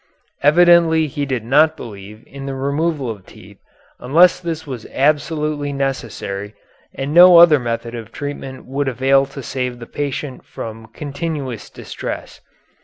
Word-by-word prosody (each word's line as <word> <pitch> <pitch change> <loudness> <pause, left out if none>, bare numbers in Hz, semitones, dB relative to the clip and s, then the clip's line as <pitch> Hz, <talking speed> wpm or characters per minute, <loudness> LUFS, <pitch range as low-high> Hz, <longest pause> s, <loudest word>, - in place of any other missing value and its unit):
Evidently 165 +1 +5
he 145 -1 -4
did 125 -4 -3
not 155 +5 +4
believe 105 0 -10
in 140 0 -9
the 135 - -4
removal 140 +1 -1
of 105 -4 -6
the - - -18
teeth - - -15 0.4
unless 165 +8 +4
this 165 -3 -5
was 130 -6 -7
absolutely 150 0 0
necessary 115 -7 -4 0.4
and 135 +2 -4
no 175 +1 +9
other 170 -4 +8
method 115 -1 -4
of 115 -2 -8
treatment 145 -2 -7
would 140 +2 -2
avail 135 +2 +2
to 140 -1 -9
save 125 -1 -3
the 120 - -9
patient 140 0 -5
from 115 0 -8
continuous 140 -1 -5
distress. - - -7
140 Hz, 145 wpm, -19 LUFS, 120-155 Hz, 0.4 s, no